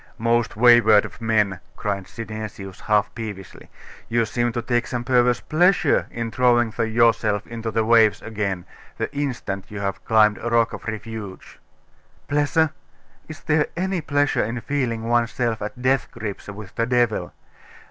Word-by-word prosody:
'Most 115 0 +1
wayward 115 -3 +6
of - - -11
men!' 105 -5 +1 0.2
cried 100 -2 -3
Synesius, 110 -4 -7
half 105 -1 +1
peevishly; 105 -6 -8 0.4
'you 115 0 +2
seem 120 +2 -1
to 120 - -3
take 120 0 0
some 120 -1 -3
perverse 125 -1 +2
pleasure 175 0 +2
in 115 -1 -4
throwing 120 -2 +3
yourself 110 -2 +2
into 115 -1 -5
the 110 0 0
waves 115 -2 +5
again, 100 -5 -3 0.3
the - - -4
instant 125 -9 -3
you 105 - -6
have 95 -1 -3
climbed 110 -2 +3
a 120 - -3
rock 115 -1 +2
of - - -8
refuge!' 110 -3 -7 0.7
'Pleasure? 150 +2 +2 0.6
Is 155 - -10
there 150 -1 +1
any 185 0 -1
pleasure 145 -1 +1
in 120 +2 -3
feeling 120 -3 -2
oneself 120 0 0
at 105 +3 -6
death 130 +2 +1
grips 110 -4 -7
with 100 -1 -9
the 115 - -1
devil? 120 -3 +1
115 Hz, 150 wpm, -22 LUFS, 105-120 Hz, 0.7 s, wayward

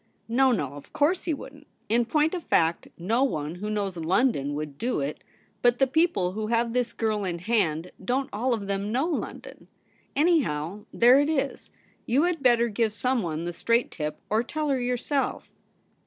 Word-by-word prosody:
' - - -43
No, 265 -1 +6
no; 145 - -1
of 145 0 -12
course 330 +6 +1
he 335 - 0
wouldn't. 290 +2 -12 0.2
In 235 +2 +2
point 305 +7 +2
of 355 -3 -3
fact, 165 0 +1
no 225 +9 +1
one 155 - -1
who 200 +4 -5
knows 200 -4 -2
London 165 - +1
would 150 -1 -5
do 245 -5 0
it. 140 +2 -4 0.4
But 245 0 +4
the 270 - +4
people 270 - +1
who 215 +2 -3
have 230 0 +1
this 250 -1 0
girl 215 -2 -1
in 175 -3 -2
hand 180 -4 0
don't 260 +6 0
all 240 +5 0
of 205 -3 -6
them 200 +1 -2
know 260 +6 +1
London. 335 -2 -5 0.5
Anyhow, 210 - +1
there 245 +3 +6
it 290 +1 +2
is. 280 -3 -2 0.4
You 265 +6 +3
had 350 -3 0
better 240 -2 +4
give 220 0 0
someone 205 -9 -1
the 175 - -3
straight 235 +7 +1
tip, 150 -1 -4
or 215 +2 +2
tell 300 +5 -3
her 265 -2 +1
yourself.' 250 +3 -1
230 Hz, 185 wpm, -26 LUFS, 180-270 Hz, 0.5 s, No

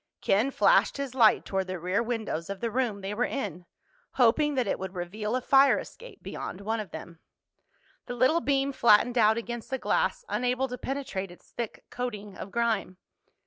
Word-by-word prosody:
Ken 210 +7 +2
flashed 275 - +3
his 280 -2 -4
light 230 -4 +4
toward 190 -1 -2
the 185 0 -4
rear 180 +5 0
windows 225 -8 -3
of 200 -1 -5
the 230 -1 -2
room 230 -4 -1
they 195 +2 -4
were 230 +4 0
in, 180 - -4 0.5
hoping 280 +4 +3
that 255 -2 +1
it 195 - -1
would 190 0 -6
reveal 210 +6 -3
a 255 - 0
fire 275 +2 +5
escape - - -10
beyond 185 - -6
one 220 +3 -2
of 210 - -5
them. 170 -1 -9 0.9
The 245 - -4
little 260 +8 +3
beam 275 -1 +1
flattened 235 -1 +4
out 220 0 +5
against 235 0 -5
the 265 - -1
glass, 485 - 0
unable 250 +2 0
to 250 - -5
penetrate 260 -9 -4
its 175 - -17
thick 235 -3 -6
coating 210 -5 -5
of - - -7
grime. 230 -5 -1
230 Hz, 185 wpm, -28 LUFS, 200-255 Hz, 0.9 s, fire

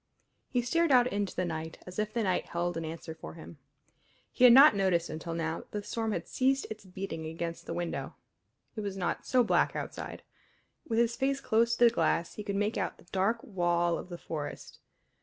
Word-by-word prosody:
He 245 -2 0
stared 335 +6 +2
out 250 -2 +6
into 205 -5 -2
the 185 - 0
night, 160 -1 -5
as 180 +3 -7
if 215 0 -1
that 235 -2 0
night 185 -2 0
held 175 0 -2
an 165 - -3
answer 160 0 -6
for 160 - -10
him. 160 -2 -11 0.7
He 250 - +4
had 245 - +10
not 270 0 +9
noticed 185 -4 +1
until 165 +1 -5
now 165 0 -2
that - - -14
the 205 -1 -3
storm 225 +1 -2
had - - -3
ceased 270 +1 +1
its 215 -2 -7
beating 180 -4 -5
against 165 +1 -5
the - - -3
window. 175 -1 -3 0.6
It 215 - -3
was 200 -2 -4
not 180 - -2
so 255 -1 +4
black 220 - +2
outside. - - -6 0.7
With 225 - 0
his 235 0 +3
face 275 +1 0
close 235 -2 +2
to 240 - +5
the 235 - +6
glass 170 -6 +1
he 210 - -6
could 200 -1 -3
make 205 +2 0
out - - -2
the - - -18
dark 200 +5 +1
wall 175 -2 +1
of - - -9
the 175 - -6
forest. 150 -3 -6
195 Hz, 215 wpm, -30 LUFS, 170-235 Hz, 0.7 s, had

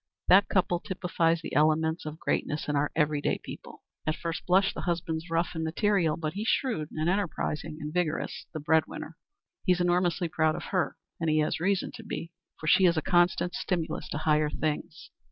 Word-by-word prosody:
That 195 +2 +7
couple 180 -2 +2
typifies 170 -3 0
the - - -6
elements 155 +1 +2
of 155 +1 -6
greatness 150 -1 -1
in 150 - 0
our 145 +1 +1
every 150 -2 +2
day - - +1
people. - - -10 0.2
At 155 - +1
first 165 -1 -5
blush 190 +2 +4
the - - -5
husband's 165 -1 -2
rough 165 +1 +1
and 160 -1 -3
material, 170 0 +1
but 155 -2 -3
he's 210 +4 -3
shrewd 220 - 0
and 155 +1 -2
enterprising 160 -5 -1
and 150 0 -5
vigorous 175 -3 -2
the 155 - -5
bread 155 +1 +3
winner. - - -8 0.5
He's 180 -1 +3
enormously 175 0 +2
proud 160 -1 +1
of - - -5
her, 185 -2 0 0.2
and 165 -2 0
he 155 - +3
has 155 +1 0
reason 195 +2 0
to 230 - -10
be, 170 -5 -5 0.3
for - - -7
she 185 +5 +5
is 170 -2 +4
a 155 - 0
constant 175 0 +2
stimulus 175 -4 -2
to - - -3
higher 150 -1 +2
things. 155 0 -4
165 Hz, 195 wpm, -28 LUFS, 155-180 Hz, 0.5 s, That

